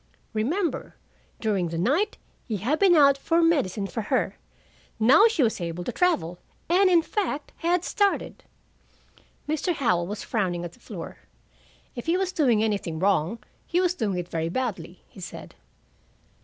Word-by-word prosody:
Remember, 310 - -1 0.4
during 195 -6 0
the 165 - -4
night 285 - +1 0.3
he 220 -4 -2
had 255 - -1
been 385 -3 +5
out 280 -3 +5
for 330 +4 +1
medicine 250 - +1
for 225 +3 -4
her. 205 - 0 0.6
Now 275 - +7
she 400 -11 +1
was 220 -5 0
able 170 +1 -4
to 245 - -3
travel, 180 - 0 0.3
and, 370 +2 +5
in 340 -2 +4
fact, 335 -7 -3
had 345 +1 +1
started." 405 0 0 1.0
Mr. 315 +3 -1
Howell 180 -11 +1
was 210 +2 -5
frowning 180 -6 -1
at 170 - -7
the - - -20
floor. - - -8 0.8
"If 240 - -7
he 340 +2 +3
was 380 -1 -1
doing 250 - +2
anything 200 -7 -1
wrong, 195 +4 0 0.2
he 350 - +1
was 365 -1 +2
doing 215 - -2
it 175 -1 -4
very 165 -1 -2
badly," 185 -5 -4
he - - -15
said. 175 - -9
240 Hz, 160 wpm, -25 LUFS, -, 1.0 s, Now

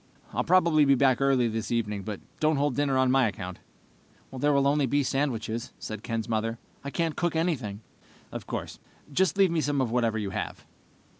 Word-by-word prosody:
"I'll - - 0
probably 170 -4 +4
be 140 -1 +5
back 130 -1 +3
early 135 -3 +3
this 115 -1 -3
evening, 105 -4 -1
but 105 0 -5 0.2
don't 155 0 +3
hold 140 -2 +1
dinner 140 -2 +1
on 130 -1 +3
my 130 -2 +4
account." 90 -2 -6 0.8
"There 145 +3 +2
will 140 -1 +3
be - - +3 0.2
only 140 +2 +2
sandwiches," 120 -4 -2
said 110 -1 -6
Ken's 115 -1 -3
mother. 115 0 -1 0.3
"I 140 - -4
can't 165 +1 -1
cook 175 -2 -1
anything." 130 - -1 0.5
"Of - - -7
course. - - -5 0.3
Just 190 +2 +2
leave 195 -3 +5
me 165 -2 +1
some 145 -1 0
of 125 -4 0
whatever 115 -2 +1
you 100 -3 -3
have." - - -5
130 Hz, 195 wpm, -27 LUFS, 115-145 Hz, 0.8 s, be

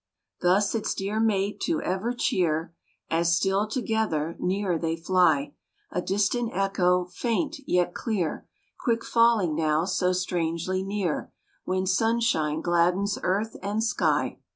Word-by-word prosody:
Thus 190 +3 +3
its 225 -2 -1
dear 200 +3 -2
mate 205 -2 +1
to 330 - 0
ever 190 +6 -1
cheer, 165 -8 0 0.4
As, 170 +1 +3
still 195 +3 +1
together, 215 - -1
near 185 -2 0
they 165 0 -1
fly, 165 -4 +2 0.4
A 180 - -1
distant 205 +6 0
echo, 180 -2 +2
faint, 250 - -2
yet 180 0 +1
clear, 195 -9 -2 0.3
Quick 230 -3 0
falling 230 -8 +3
now 155 +1 +1
so 185 -1 +1
strangely 180 0 -1
near 195 -4 -2 0.3
When 185 0 0
sunshine 190 -6 +1
gladdens 180 +4 +1
earth 205 +4 -1
and 205 +3 -1
sky. 230 +2 0
185 Hz, 130 wpm, -26 LUFS, 170-215 Hz, 0.4 s, Thus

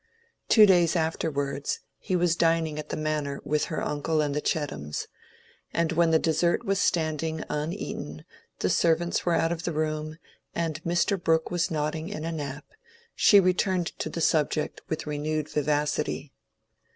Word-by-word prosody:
Two 215 -2 +8
days 175 -3 +4
afterwards, 145 -4 -1 0.2
he 185 - -2
was 175 -2 +2
dining 165 -2 +1
at 150 - -7
the - - -3
Manor 150 -2 -2
with 150 0 0
her 155 - -3
uncle 150 +2 -1
and 145 -2 +1
the 150 - -1
Chettams, 105 - -2 0.7
and 165 0 +1
when 165 0 +3
the 160 - +5
dessert 170 +2 +1
was 195 0 +1
standing 160 -2 0
uneaten, 150 - -4 0.4
the - - +1
servants 170 +1 +1
were 170 - +3
out 165 - +2
of 170 -1 -2
the 175 - -2
room, 155 0 -2 0.4
and 165 -1 -2
Mr. 175 +3 +1
Brooke 160 0 +2
was 175 -1 +1
nodding 155 +2 -2
in 160 -6 -5
a 165 - -2
nap, 145 -2 -5 0.5
she 205 - +6
returned 185 -1 +1
to - - -2
the 165 - -4
subject 155 -1 +1
with 160 - -3
renewed 150 0 -2
vivacity. 150 0 -1
160 Hz, 160 wpm, -27 LUFS, 150-170 Hz, 0.7 s, Two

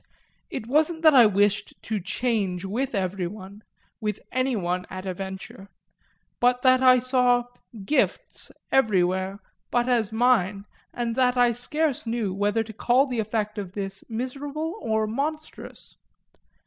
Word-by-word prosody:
It - - -5
wasn't 315 +6 +1
that 315 -1 +7
I 245 -5 +8
wished 205 0 +1
to 215 -1 -2
change 195 -2 -1
with 240 +6 -2
everyone, 190 +1 -4 0.4
with 210 -2 -3
anyone 205 -9 -1
at 185 0 -7
a 185 - -2
venture, 190 +1 -8 0.7
but 245 0 +2
that 255 0 +5
I 255 -1 +7
saw 250 -1 +2 0.4
"gifts" 300 - -1 0.2
everywhere 190 -5 +2 0.3
but 240 0 +1
as 230 -4 +1
mine 220 -4 +2 0.3
and 235 -1 -2
that 250 -1 +3
I 245 -1 +5
scarce 275 +3 -1
know 225 -4 -1
whether 205 +3 0
to 220 0 -10
call 245 +5 +3
the 250 -4 -3
effect 215 -1 -2
of 190 -3 -7
this 195 -1 -5
miserable 280 +7 -4
or 220 0 0
monstrous. 300 +8 -5
225 Hz, 135 wpm, -25 LUFS, 195-255 Hz, 0.7 s, I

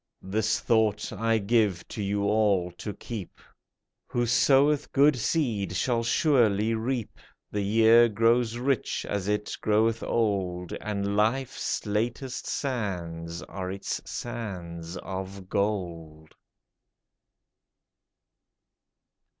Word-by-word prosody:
This 105 +3 0
thought 110 -3 +1
I 115 0 +1
give 105 -4 +1
to 110 - -5
you 100 0 -1
all 100 -4 +2
to 105 +4 -6
keep: 105 -1 -8 0.7
Who 120 0 0
soweth 140 +4 +3
good 145 +1 +5
seed 110 - -1
shall 115 +6 +1
surely 115 -4 +3
reap; 115 0 -3 0.3
The 105 - -1
year 115 +3 +5
grows 115 +2 +2
rich 130 +1 -1
as 100 -2 -2
it 105 0 -1
groweth 110 +2 +2
old. 95 -6 -1
And 100 -1 -2
life's 115 +6 0
latest 120 +5 -2
sands 85 - -3
are 95 -1 -5
its 100 +1 -4
sands 90 -7 -6
of 95 0 -6
gold 85 -7 -3
105 Hz, 100 wpm, -27 LUFS, 95-115 Hz, 0.7 s, good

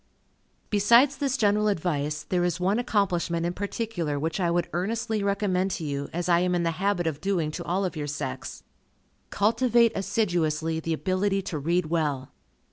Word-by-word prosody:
Besides 235 +7 +5
this 270 -2 0
general 210 -2 +2
advice, 155 -6 -1
there 180 +1 0
is 175 -1 0
one 195 +5 +1
accomplishment 175 -7 0
in 175 - -1
particular, 195 -6 -3
which 160 +5 -2
I 175 -2 +1
would 170 0 +1
earnestly 220 +5 -1
recommend 200 -2 +1
to 165 - -6
you, 140 -1 -3
as 175 +1 -3
I 170 -1 +4
am 180 0 +1
in 175 - 0
the 165 - +1
habit 195 -3 +1
of 155 -2 -2
doing 180 -6 0
to 175 - -5
all 190 +3 0
of 180 - -3
your 150 -1 -3
sex. 140 - -5 0.7
Cultivate 235 +2 +3
assiduously 165 -6 0
the 165 0 -2
ability 195 +3 0
to 155 - -4
read 170 +4 +1
well. 145 -6 -1
180 Hz, 175 wpm, -26 LUFS, 160-205 Hz, 0.7 s, Besides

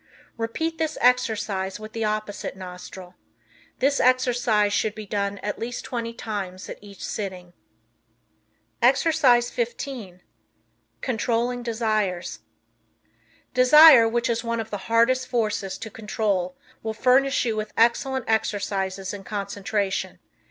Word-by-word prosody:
Repeat 320 +9 -3
this 315 -1 -1
exercise 215 -6 +1
with 215 0 -9
the 225 - -2
opposite 215 -2 -3
nostril. 180 0 -9 0.6
This 280 +1 +2
exercise 245 -5 +2
should 215 0 0
be 215 0 -7
done 200 0 -2
at 205 - -3
least 240 +2 -5
twenty 235 -3 -3
times 200 -5 -5
at - - -7
each 200 -1 -9
sitting. 185 -4 -5 1.3
Exercise 255 -2 +4
15 235 -6 -4 0.8
Controlling 245 0 -1
Desires. 215 -6 -1 1.1
Desire, 255 0 +8
which 235 +1 0
is 235 0 -1
one 230 0 -2
of 225 0 -5
the 205 - -2
hardest 250 +3 +3
forces 210 -5 -1
to 220 - -8
control, 205 -4 -2 0.2
will 220 0 -4
furnish 265 +3 +3
you 225 -2 0
with 215 0 -4
excellent 250 +2 +2
exercises 195 -3 -1
in 200 -1 -7
concentration. 200 -1 -3
220 Hz, 120 wpm, -24 LUFS, 200-245 Hz, 1.3 s, Desire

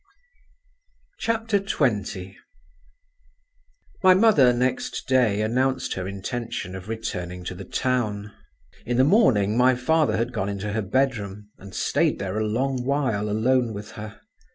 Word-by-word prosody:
XX 155 - -1 1.7
My 185 -2 +7
mother 185 - +5
next 125 +1 -2
day 125 -6 +3
announced 130 +3 0
her 95 -1 -4
intention 100 -1 -5
of 95 +2 -9
returning 90 -5 -4
to 90 - -5
the 95 +2 -9
town. 105 -5 -1 0.5
In 120 0 -2
the 130 - +5
morning 130 - +4
my 125 +1 +4
father 155 +5 +2
had 120 +2 -2
gone 100 -4 -2
into 100 +1 -4
her 110 - 0
bedroom, 105 -3 -1
and 95 0 -11
stayed - - +1
there 100 +2 -3
a 110 - 0
long 130 +3 -1
while 130 -7 0
alone 120 +2 +1
with 105 +2 -8
her. 110 0 -9
115 Hz, 130 wpm, -24 LUFS, 100-130 Hz, 1.7 s, My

